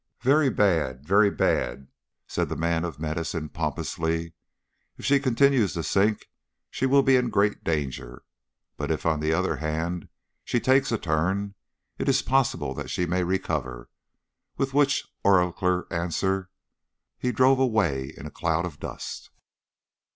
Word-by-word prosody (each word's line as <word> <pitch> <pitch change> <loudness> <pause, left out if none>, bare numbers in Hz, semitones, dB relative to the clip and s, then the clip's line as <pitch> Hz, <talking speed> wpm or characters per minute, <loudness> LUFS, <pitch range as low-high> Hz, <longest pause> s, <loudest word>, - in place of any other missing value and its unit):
"Very 140 +2 +4
bad, 80 - +1
very 100 +4 +5
bad," 65 -7 0 0.4
said - - -2
the - - -3
man 85 0 0
of 80 -5 -6
medicine 80 0 -3
pompously. 80 +1 -2 0.6
"If - - -8
she 140 +1 +4
continues 130 -4 +3
to 85 - -3
sink 105 +5 +1 0.4
she 130 - 0
will 140 +1 +5
be 135 -1 +5
in 125 -1 +1
great 105 0 +1
danger; 65 -6 -3 0.5
but - - -3
if, - - -2
on 80 -2 +2
the 75 +1 0
other 80 -1 0
hand, 80 +3 -3 0.3
she 120 - 0
takes 135 +2 +3
a 115 - +1
turn, 95 +5 -1 0.5
it - - 0
is 135 0 +3
possible 135 -1 +1
that - - -6
she 90 - -1
may 90 +1 0
recover," 75 -9 -3 0.7
with 135 0 -1
which 140 0 +2 0.2
oracular 90 -1 +2
answer 90 +3 -1 0.7
he 125 - 0
drove 130 +3 +4
away 95 - +1
in - - -9
a 75 - -7
cloud 85 0 -1
of 80 -5 -8
dust. - - -7
90 Hz, 150 wpm, -26 LUFS, 80-120 Hz, 0.7 s, very